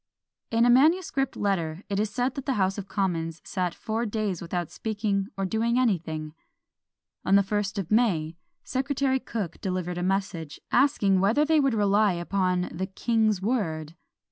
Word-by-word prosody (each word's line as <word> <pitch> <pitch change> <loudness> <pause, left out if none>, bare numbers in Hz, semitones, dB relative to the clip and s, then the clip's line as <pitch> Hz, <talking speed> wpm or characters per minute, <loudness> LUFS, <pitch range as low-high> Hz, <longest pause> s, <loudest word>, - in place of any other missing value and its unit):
In 230 +1 +3
a - - +4
manuscript 280 0 +3
letter 175 -3 -1
it 200 -1 -1
is 215 0 0
said 245 +4 -1
that 275 0 -7
the 270 - +1
House 195 0 +1
of 195 - -7
Commons 170 -5 -2
sat 180 -3 -2
four 225 +2 -2
days 210 -4 -2
without 175 -1 -3
speaking 205 -3 -2
or 195 - -1
doing 225 +5 0
anything. 160 -10 0 0.9
On 195 - +3
the 200 - +6
first 205 0 -2
of 195 -2 -4
May, 175 -9 +2 0.3
Secretary 265 0 0
Cooke 205 -9 -5
delivered 180 -2 -2
a - - -2
message, 185 -5 -2
asking 230 -8 +3
whether 220 +10 +3
they 315 0 +3
would 275 -5 +2
rely 205 -1 +3
upon 180 +1 -1
the 190 +2 -3
king's 215 -1 +1
word? 165 -9 -1
200 Hz, 165 wpm, -26 LUFS, 180-235 Hz, 0.9 s, the